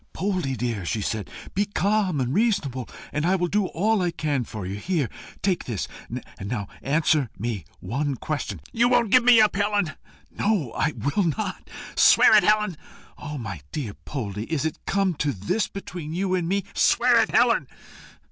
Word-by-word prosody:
"Poldie, 185 -9 -1
dear," 115 -4 -2
she 100 +5 -2
said, 105 0 -3 0.2
"be 200 - +2
calm 200 -4 +1
and 130 0 -1
reasonable, 180 - 0 0.2
and 150 - -1
I 180 +3 +3
will 180 -2 +1
do 200 +2 +1
all 210 +5 +1
I 175 - +1
can 150 -6 -1
for 110 -4 -7
you. 95 - -4
Here, 160 - 0 0.4
take 190 -3 +1
this. 115 -6 -3 0.2
And - - -5 0.3
now, 105 -4 -3
answer 150 -2 +2
me 110 -7 -3 0.2
one 140 +3 -2
question" 130 - -4
"You 240 +1 +3
won't 240 -4 +3
give 255 -1 +6
me 240 -2 +7
up, 215 -2 +4
Helen?" 205 -4 +1 0.4
"No. 200 - 0
I 155 - +1
will 180 +8 0
not." 200 -3 -4 0.3
"Swear - - +7
it, - - +8
Helen." 210 -5 +2 0.4
"Ah, 150 0 -6
my 105 - -6
poor 125 -9 -4
Poldie! 105 -6 -4
is 155 -2 0
it 160 - -3
come 195 -2 +2
to 145 -1 0
this 110 - -1
between 175 -5 -7
you 185 +1 0
and 175 -2 0
me?" 200 +1 +1
"Swear - - +4
it, - - 0
Helen." - - +3
160 Hz, 180 wpm, -25 LUFS, 125-200 Hz, 0.4 s, it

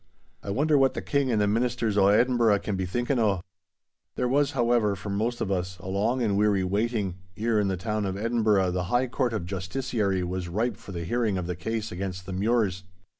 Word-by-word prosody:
I - - -8
wonder 145 +7 +2
what 135 -1 +3
the - - -2
King 140 -3 +1
and 110 - +2
the 105 - +3
ministers 115 0 0
o' 100 -1 +5
Edinburgh 115 0 +4
can 105 - -2
be 95 -1 -2
thinkin' 120 +7 0
o'?' 100 -5 +2 0.7
There 125 - 0
was, 140 +2 +2
however, 120 -5 +2
for 100 +1 -6
most 115 +4 -1
of 100 - -1
us 90 -1 -2
a 90 - -10
long 105 +7 0
and 105 -3 +1
weary 100 -2 +2
waiting, 100 -1 -1 0.2
ere 110 0 +1
in 105 - +1
the 95 -1 -1
town 105 +1 -2
of 95 0 -3
Edinburgh 105 -4 +2
the 90 0 -1
High 120 +7 +2
Court 125 0 -1
of 110 -6 -3
Justiciary 100 +1 -1
was 90 0 -3
ripe 110 +7 -1
for - - -11
the 85 -2 -4
hearing 110 +1 0
of 90 - -3
the 90 0 -3
case 110 +4 -3
against 90 0 -5
the 95 - -6
Mures. 100 -1 +1
105 Hz, 220 wpm, -27 LUFS, 95-120 Hz, 0.7 s, o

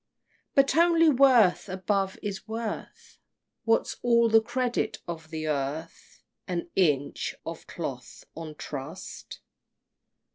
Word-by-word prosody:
But 275 0 +4
only 330 -1 +5
worth, 250 -9 +5
above, 190 +1 -1
is 205 0 -5
worth. 225 0 -6 0.5
What's 225 0 +1
all 235 -1 +4
the 225 0 +6
credit 250 +2 -1
of 165 -2 -6
the 155 -1 -4
earth? 150 +2 -4 0.2
An 175 -1 -3
inch 150 -7 +1
of - - -7
cloth - - -6
on 160 -2 -8
trust? 150 +5 -8
195 Hz, 110 wpm, -27 LUFS, 160-235 Hz, 0.5 s, the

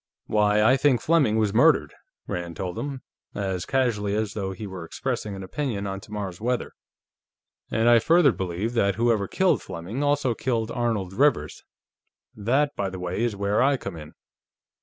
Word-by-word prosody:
"Why, 105 0 +3
I 130 +5 +5
think 135 -3 +3
Fleming 145 -10 +2
was 105 -2 +1
murdered," 120 - +4 0.3
Rand 85 -1 -5
told 90 +1 -4
him, 140 -2 -5 0.3
as 95 -3 -3
casually 110 -6 0
as 110 -1 -1
though 95 -3 -3
he 95 +3 -7
were 95 -3 -7
expressing 105 +2 -4
an 95 - -7
opinion 110 -1 -3
on 95 0 -4
tomorrow's 100 -3 -6
weather. 125 +2 -1 1.0
"And 115 +1 +1
I 120 -1 +7
further 165 +2 +5
believe 95 +3 -3
that 100 -5 +2
whoever 115 -3 +1
killed 190 -1 +2
Fleming 95 +8 -6
also 145 -3 +1
killed 115 -1 -2
Arnold 115 -7 -1
Rivers. 115 - +1 0.7
That, 135 +8 +1
by 100 - -1
the 95 - -7
way, 90 +3 -3
is 120 -3 0
where 100 +2 +1
I 135 +1 +3
come 100 -7 -7
in. 75 -2 -11
105 Hz, 170 wpm, -25 LUFS, 95-125 Hz, 1.0 s, I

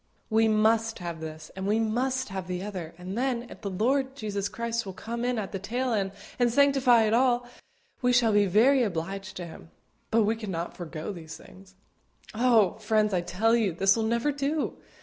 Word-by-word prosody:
"We 220 +1 +4
must 220 +1 +2
have 170 -2 -6
this, 155 0 -8
and 190 0 -4
we 215 +2 +2
must 255 +3 0
have 190 -1 -5
the 180 0 -3
other; 180 -5 -6
and 185 +2 -6
then, 245 -1 0
if - - -11
the 200 - -3
Lord 260 +7 0
Jesus 205 -4 -3
Christ 235 0 -2
will 190 - -7
come 235 +5 -5
in 245 0 0
at 205 -3 -3
the 195 - -4
tail 245 +5 -2
end 195 -3 0 0.3
and 240 -1 +3
sanctify 265 -3 +5
it 215 0 +1
all, 245 0 +2 0.5
we 250 -1 +3
shall 240 -3 +4
be 205 -1 +4
very 235 +9 +5
much 240 - +3
obliged 190 +2 -5
to 180 - -5
Him; 165 0 -12 0.4
but 225 0 +3
we 215 +2 +1
cannot 190 -7 -5
forego 165 +1 -6
these 160 -3 -9
things." 190 0 -16 0.6
Oh! 225 -5 +3
friends, 215 -1 +1
I 180 - +2
tell 220 +7 +1
you, 215 -6 +1
this 195 +4 +3
will 225 - -1
never 235 +6 +1
do. 285 +2 -1
220 Hz, 205 wpm, -27 LUFS, 190-240 Hz, 0.6 s, sanctify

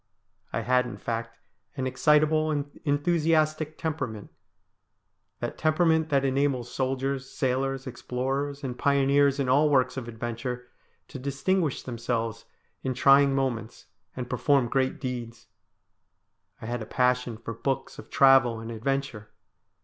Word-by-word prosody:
I - - -1
had, 125 0 +2
in 120 - -7
fact, 115 0 -4 0.4
an 130 - -1
excitable 155 +4 +3
and 145 -1 -3
enthusiastic 155 0 +1
temperament; 125 -10 -4 1.1
that - - -4
temperament 160 0 +2
that 140 -2 +2
enables 135 -2 0
soldiers, 135 0 -2
sailors, 135 +1 -1
explorers, 135 +3 -3
and 125 -2 -3
pioneers 140 +1 +3
in 135 - 0
all 145 +4 +4
works 130 -2 +2
of 125 -3 -5
adventure, 120 +2 -5 0.4
to 135 - -7
distinguish 140 +4 -1
themselves 115 -2 -3 0.4
in 130 -1 -2
trying 140 +1 +5
moments, 125 -4 -2 0.3
and 125 -1 -4
perform 140 -3 +2
great 130 0 0
deeds. 120 -4 -6 1.1
I - - -8
had 120 +1 -3
a 110 - -6
passion 125 -2 +1
for 115 0 -6
books 130 +4 -3
of - - -11
travel 135 -4 +5
and 115 +1 -7
adventure. 120 -2 -3
135 Hz, 130 wpm, -27 LUFS, 120-145 Hz, 1.1 s, trying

